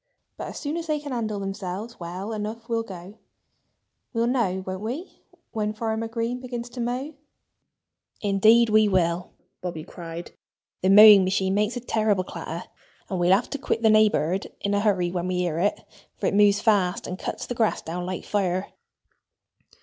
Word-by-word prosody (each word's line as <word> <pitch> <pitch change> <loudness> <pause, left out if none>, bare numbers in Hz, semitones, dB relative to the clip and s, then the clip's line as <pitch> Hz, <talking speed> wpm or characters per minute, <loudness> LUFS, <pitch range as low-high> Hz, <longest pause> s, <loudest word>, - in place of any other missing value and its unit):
"But - - -6
as - - -7
soon 300 +2 -3
as 335 -1 -5
they 305 -1 0
can 290 -1 -7
handle 220 -4 -2
themselves 195 +3 -5
well 185 +5 -5
enough 220 +2 -5
we'll 230 -1 0
go. 195 0 -10 0.9
We'll 230 0 +1
know 220 -7 0
won't 185 0 -5
we 260 - -6 0.3
when 215 -1 -2
Farmer 225 0 -2
Green 230 +2 -2
begins 245 -1 -6
to 245 0 -5
mow?" 250 +6 -3 1.1
"Indeed 215 +3 +4
we 215 0 +5
will!" 175 -2 +1 0.3
Bobby 170 -4 -5
cried. 170 0 -8 0.5
"The 185 - +2
mowing 205 0 +10
machine 190 0 +1
makes 210 +4 0
a - - -4
terrible 215 -5 +1
clatter. 170 -1 -7 0.4
And 185 - -1
we'll 175 +1 +3
have 220 - -2
to 285 - -3
quit 230 -4 -2
the 220 - +6
neighborhood 205 -4 +2
in 200 - 0
a 200 - +2
hurry 190 -4 +1
when 175 0 -2
we 185 - -1
hear 175 -3 -1
it, 205 +4 +1 0.4
for - - -4
it - - +1
moves 205 0 +4
fast, 195 -5 +2
and 185 +1 -5
cuts - - -4
the - - -4
grass 230 -2 0
down 175 +2 -4
like 185 -1 -4
fire." 190 -2 -1
205 Hz, 180 wpm, -25 LUFS, 185-230 Hz, 1.1 s, mowing